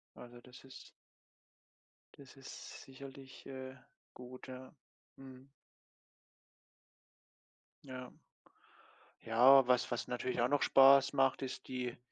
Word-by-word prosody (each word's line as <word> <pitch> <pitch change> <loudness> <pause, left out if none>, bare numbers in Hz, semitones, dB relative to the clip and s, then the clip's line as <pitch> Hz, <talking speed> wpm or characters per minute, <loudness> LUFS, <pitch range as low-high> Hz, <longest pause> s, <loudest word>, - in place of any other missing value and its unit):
Also, 120 0 -13
das 125 0 -16
ist 135 0 -14 1.2
das 140 -2 -16
ist 135 -1 -11
sicherlich, 135 0 -13
äh, 130 0 -8 0.4
gut, 125 +1 -12
ja. 130 0 -11 0.4
Mhm. 130 0 -14 2.4
Ja. 130 -2 -9 1.1
Ja, 125 +3 +5
was 125 0 +1
was 120 +1 -3
natürlich 125 0 -4
auch 120 - +2
noch 145 +2 0
Spaß 135 0 +6
macht, 135 -1 +1
ist 130 -1 -7
die 125 -2 -5
130 Hz, 105 wpm, -34 LUFS, 125-135 Hz, 2.4 s, Spaß